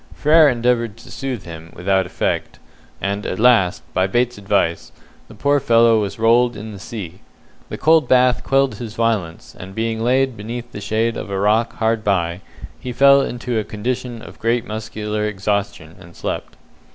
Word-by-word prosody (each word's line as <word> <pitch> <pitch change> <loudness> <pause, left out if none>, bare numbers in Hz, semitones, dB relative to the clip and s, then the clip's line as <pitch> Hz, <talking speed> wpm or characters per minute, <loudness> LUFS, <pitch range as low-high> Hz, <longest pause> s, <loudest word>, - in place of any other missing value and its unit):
Frere 155 0 +5
endeavoured 120 -3 0
to 115 - -14
soothe 130 -7 -4
him, 80 -1 -10
without 95 +1 +1
effect; - - -2 0.4
and 100 +1 -2
at 95 - -3
last, 110 -6 +3
by 95 +1 +2
Bates's 120 +2 0
advice, 100 -4 0 0.4
the - - -14
poor 145 0 +2
fellow 115 -4 +4
was 100 -2 -4
rolled 115 +1 +3
in 110 +1 -7
the 100 - -9
sea. 95 -4 -7 0.5
The - - -5
cold 160 -1 +4
bath 125 -1 +3
quelled 135 0 +2
his 115 -3 -7
violence, 110 -8 -2
and, 95 +1 -9
being 115 0 -2
laid 130 +2 +2
beneath 120 +3 -7
the 105 - -8
shade 110 +3 -1
of - - -6
a 100 - -2
rock 110 +4 +2
hard 115 -1 0
by, 90 -3 0 0.4
he 125 - -6
fell 140 +2 +6
into 120 -3 -2
a - - -2
condition 120 +2 -4
of - - -12
great 115 +1 0
muscular 110 -1 -3
exhaustion, 100 -5 -3
and 85 0 -15
slept. - - -5
110 Hz, 175 wpm, -20 LUFS, 100-125 Hz, 0.5 s, fell